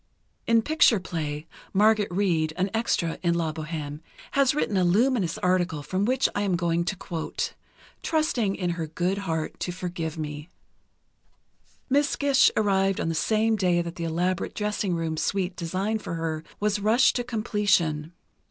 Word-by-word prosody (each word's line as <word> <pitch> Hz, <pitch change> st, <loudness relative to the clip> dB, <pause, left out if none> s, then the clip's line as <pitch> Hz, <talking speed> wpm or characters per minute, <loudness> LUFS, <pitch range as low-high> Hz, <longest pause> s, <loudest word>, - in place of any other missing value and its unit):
In 230 Hz, -1 st, +4 dB
Picture 300 Hz, -7 st, +4 dB
Play, 155 Hz, -4 st, -4 dB, 0.3 s
Margaret 210 Hz, +1 st, +4 dB
Reid, 170 Hz, -5 st, +1 dB
an 190 Hz, +1 st, 0 dB
extra 205 Hz, -7 st, 0 dB
in 170 Hz, -1 st, +2 dB
"La 165 Hz, -2 st, -1 dB
Bohême," 150 Hz, -2 st, -5 dB, 0.3 s
has 275 Hz, 0 st, +3 dB
written 255 Hz, -8 st, 0 dB
a 185 Hz, -, +3 dB
luminous 200 Hz, 0 st, +2 dB
article, 180 Hz, -4 st, 0 dB
from 185 Hz, +7 st, -1 dB
which 255 Hz, +3 st, +2 dB
I 205 Hz, -, -1 dB
am 195 Hz, -3 st, +1 dB
going 170 Hz, -1 st, 0 dB
to 190 Hz, -, -1 dB
quote, 170 Hz, -3 st, -4 dB, 0.5 s
trusting 250 Hz, -11 st, 0 dB
in 180 Hz, -2 st, -1 dB
her 165 Hz, -2 st, -3 dB
good 180 Hz, +5 st, -1 dB
heart 160 Hz, -1 st, -2 dB
to 180 Hz, -, -2 dB
forgive 175 Hz, -3 st, -4 dB
me: 150 Hz, +1 st, -5 dB, 1.4 s
Miss 285 Hz, +2 st, +2 dB
Gish 280 Hz, -2 st, +4 dB
arrived 195 Hz, -2 st, +2 dB
on -, -, -1 dB
the -, -, 0 dB
same 220 Hz, +6 st, +2 dB
day 180 Hz, -4 st, +2 dB
that 170 Hz, 0 st, -6 dB
the 170 Hz, -, -4 dB
elaborate 175 Hz, +2 st, -1 dB
dressing 210 Hz, -3 st, -1 dB
room 165 Hz, -1 st, -2 dB
suite 190 Hz, +2 st, -1 dB
designed 195 Hz, +5 st, -2 dB
for 170 Hz, -, -4 dB
her 160 Hz, -1 st, -3 dB, 0.2 s
was 210 Hz, 0 st, +1 dB
rushed 220 Hz, +5 st, +4 dB
to 245 Hz, -, -1 dB
completion.... 200 Hz, -9 st, 0 dB
185 Hz, 160 wpm, -26 LUFS, 165-210 Hz, 1.4 s, In